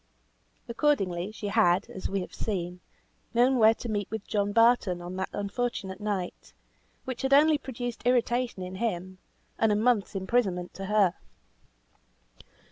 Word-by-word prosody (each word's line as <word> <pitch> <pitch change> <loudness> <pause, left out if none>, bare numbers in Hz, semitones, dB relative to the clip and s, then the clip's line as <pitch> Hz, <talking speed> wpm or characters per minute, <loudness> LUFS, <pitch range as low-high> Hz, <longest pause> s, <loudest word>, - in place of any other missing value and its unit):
Accordingly, 205 - 0
she 210 -1 -5
had, 180 0 +3
as 190 - -5
we 195 0 -1
have - - -8
seen, 180 -4 -3 0.6
known 250 +2 +4
where 220 0 +6
to 240 - -7
meet 205 -3 -2
with 220 -2 -5
John 205 -1 0
Barton 230 -5 +3
on 175 +1 -7
that 190 - -2
unfortunate 200 -2 -3
night, 200 -4 -4 0.5
which 260 -2 -5
had 265 +1 +1
only 300 +1 +5
produced 245 -3 -5
irritation 245 -3 +1
in 185 +1 -6
him, 185 -4 -3 0.4
and 225 -1 +3
a - - +3
month's 220 -2 +1
imprisonment 190 -3 0
to 195 - -6
her. 200 -3 +3
210 Hz, 145 wpm, -28 LUFS, 185-240 Hz, 0.6 s, where